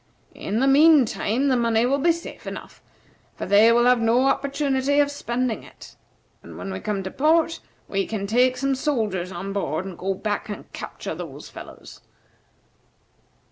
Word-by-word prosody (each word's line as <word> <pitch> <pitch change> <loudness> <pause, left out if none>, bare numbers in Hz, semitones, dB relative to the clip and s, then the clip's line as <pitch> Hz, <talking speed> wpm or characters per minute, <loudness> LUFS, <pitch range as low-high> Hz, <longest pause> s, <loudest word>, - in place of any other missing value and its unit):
In 210 +3 -3
the 270 - +3
mean 295 0 +6
time 230 +5 -1
the 260 - +3
money 230 -1 +2
will 275 +3 +1
be 340 +5 +4
safe 335 0 -8
enough, - - -8 0.5
for - - -5
they 210 +3 +6
will 240 +1 +4
have 250 -1 +4
no 235 +3 +3
opportunity 275 0 +1
of 285 0 +3
spending 250 -4 -2
it; - - -15 0.5
and - - -12
when 195 - -6
we 190 - -4
come 205 -2 -3
to 190 - -5
port, 325 +3 +2 0.3
we 195 -1 -1
can 210 -3 -3
take 250 +4 +2
some 275 +1 0
soldiers 220 - -1
on 190 +2 -5
board, 185 -3 -2
and 190 -2 -7
go 190 +1 -1
back 210 +2 -3
and 205 - -8
capture - - -6
those - - -8
fellows. - - -12
240 Hz, 175 wpm, -23 LUFS, 205-275 Hz, 0.5 s, mean